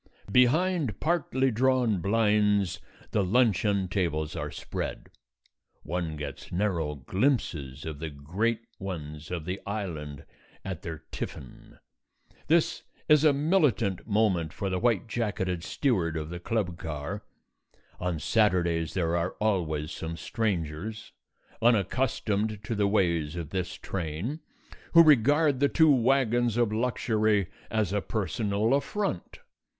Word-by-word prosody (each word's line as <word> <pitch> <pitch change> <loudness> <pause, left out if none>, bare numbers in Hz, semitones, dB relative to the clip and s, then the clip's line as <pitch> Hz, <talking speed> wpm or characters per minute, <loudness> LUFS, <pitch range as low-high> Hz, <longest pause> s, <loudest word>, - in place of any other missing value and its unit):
Behind 140 - +3
partly 135 -6 +1
drawn 120 -4 +2
blinds 105 -1 +2 0.3
the 105 - +2
luncheon 100 -2 +2
tables 80 -5 -1
are - - -3
spread; - - -5 0.7
one 85 -1 -3
gets 75 -2 -7
narrow 85 -6 0
glimpses 75 - -1
of 80 -3 -5
the 80 0 -4
great 95 +11 -1 0.2
ones 75 -5 -6
of 85 -3 -4
the 90 +2 -4
Island 80 -9 -5 0.4
at 95 -4 -4
their 80 -2 -7
tiffin. 65 - -8 0.7
This 165 +3 +2 0.3
is 150 -1 +6
a 155 - +7
militant 140 - +1
moment 100 -7 +1
for 100 -2 -3
the 90 - 0
white 115 -2 +1
jacketed 100 -6 -2
steward 90 - 0
of 75 0 -4
the 85 - -5
club 90 -3 -2
car. 80 +6 -5 0.8
On 90 -2 -1
Saturdays 85 -3 +1
there 85 -2 +1
are 85 +2 -1
always 80 -8 0
some 80 0 -5
strangers, 105 0 -3 0.5
unaccustomed 110 -2 +1
to 110 - -3
the 105 -2 +2
ways 85 -6 +1
of 85 -4 -5
this 95 -1 -2
train, 95 - -4 0.5
who 165 0 +9
regard 145 0 +4
the 140 0 +3
two 160 -2 +5
wagons 120 -2 +2
of 115 -3 +2
luxury 110 -4 +1 0.2
as 110 -4 0
a 105 - +1
personal 110 +2 0
affront. 140 - -2
100 Hz, 125 wpm, -28 LUFS, 85-115 Hz, 0.8 s, who